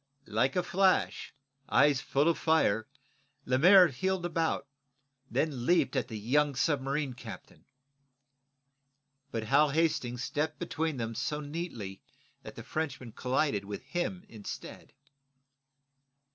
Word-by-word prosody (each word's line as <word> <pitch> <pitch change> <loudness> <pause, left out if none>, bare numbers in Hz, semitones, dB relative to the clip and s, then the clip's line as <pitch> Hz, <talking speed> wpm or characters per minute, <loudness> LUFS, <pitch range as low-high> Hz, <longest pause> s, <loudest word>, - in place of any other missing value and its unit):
Like 115 +5 0
a 180 - +2
flash, 185 +2 +2
his 140 0 -29
eyes 140 -1 +4
full 140 +2 +1
of 170 - +2
fire, 110 -10 +2 0.6
Lemaire 180 +8 +7
heeled 185 +6 -1
about, 165 -4 -1 0.6
then 135 -6 -1
leaped 175 -4 +3
at 130 -4 0
the 110 - -6
young 140 +6 +1
submarine 140 0 0
captain. 120 - -11 1.6
But 115 -4 -3
Hal 140 +6 +4
Hastings 135 -6 0
stepped 150 +2 -2
between 160 -2 -2
them 115 -1 -3
so 150 +6 -2
neatly 145 - -6 0.4
that - - -10
the - - -8
Frenchman 135 -6 -4
collided 125 -3 0
with 105 +4 -6
him 175 +6 -3
instead. 105 -3 -9
140 Hz, 120 wpm, -30 LUFS, 125-160 Hz, 1.6 s, Lemaire